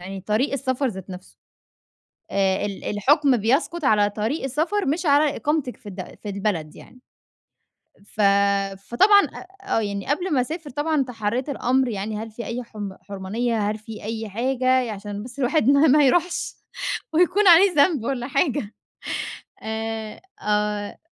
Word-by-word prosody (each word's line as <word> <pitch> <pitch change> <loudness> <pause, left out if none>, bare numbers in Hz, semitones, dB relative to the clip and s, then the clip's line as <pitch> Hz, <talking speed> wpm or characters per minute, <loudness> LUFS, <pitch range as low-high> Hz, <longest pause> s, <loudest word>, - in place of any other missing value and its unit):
يعني 190 +2 -7
طريق 215 +9 0
السفر 270 0 -1
ذات 190 -3 -8
نفسه. 95 - -11 0.9
آآ 195 0 +1
ال 200 -1 -6
الحكم 270 +5 +3
بيسقُط 275 +8 0
على 205 -3 +4
طريق 220 +9 -2
السفر 320 +10 0
مش 315 +6 -1
على 290 0 +4
إقامتك 295 -4 -1
في 205 - -11
الد 185 -1 -8
في 205 - -4
البلد 195 -6 -2
يعني. 250 - -15 1.1
فَ 215 - -5 0.6
فطبعًا 400 - +5
ق 390 +1 -13
آه، 225 - +2
يعني 200 -1 -4
قبل 345 +4 0
ما 260 - +3
أسافر 315 +4 -5
طبعًا 295 +1 0
تحَرِّيت 245 +2 -3
الأمر 260 -1 +1
يعني، 210 0 -3
هل 225 +1 -5
في 235 +2 -7
أي 240 +2 -4
حم 205 -4 -7
حُرْمَانية؟ 205 +3 -2
هل 215 - -2
في 215 0 -10
أي 220 0 -4
حاجة؟ 255 +3 +1
ي 245 - -4
عشان 205 0 -6
بس 250 +2 -11
الواحد 265 0 +2
ما 285 +3 +5
ما 295 +2 +5
يروحش 350 +6 +1 0.6
ويكون 360 +5 +3
عليه 360 +2 +8
ذنب 290 -3 +3
والَّا 245 -1 -2
حاجة 275 - 0 0.9
آآ، 220 0 -4 0.2
آآ 210 0 -1
240 Hz, 155 wpm, -23 LUFS, 210-290 Hz, 1.1 s, عليه